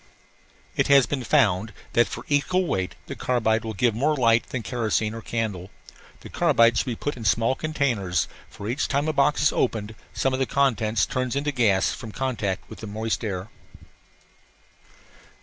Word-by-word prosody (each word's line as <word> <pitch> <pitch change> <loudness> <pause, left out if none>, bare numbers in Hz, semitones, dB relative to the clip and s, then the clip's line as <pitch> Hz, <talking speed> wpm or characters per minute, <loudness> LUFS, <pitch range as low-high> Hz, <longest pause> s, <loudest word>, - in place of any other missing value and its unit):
It - - +2
has 140 -2 +6
been 135 +1 -3
found 110 -2 +2 0.2
that 120 - +4
for - - -7
equal 180 +6 +1
weight 95 - -2
the - - -6
carbide 115 -3 +1
will 110 -1 -5
give 120 +3 +2
more 145 +7 +1
light 115 -2 +3
than 125 -3 -4
kerosene 110 -3 -1
or 115 - -6
candle. 105 -6 -3 0.5
The - - -10
carbide 115 0 +4
should - - 0
be 120 - -2
put 145 +6 -3
in 120 - -8
small 115 +4 +2
containers, 130 - -1 0.2
for 100 - -8
each 125 +3 -1
time 140 +2 0
a 155 - 0
box 145 +1 +2
is 145 - +4
opened 110 -3 -1 0.2
some 135 - 0
of 130 - -1
the 135 - +1
contents 115 -7 +1
turns 130 0 -2
into 145 +1 0
gas 110 -8 +2
from 115 -4 -7
contact 105 -7 -2
with - - -11
the 110 - -7
moist 110 +2 -2
air. 100 -1 -4
115 Hz, 180 wpm, -25 LUFS, 110-135 Hz, 0.5 s, has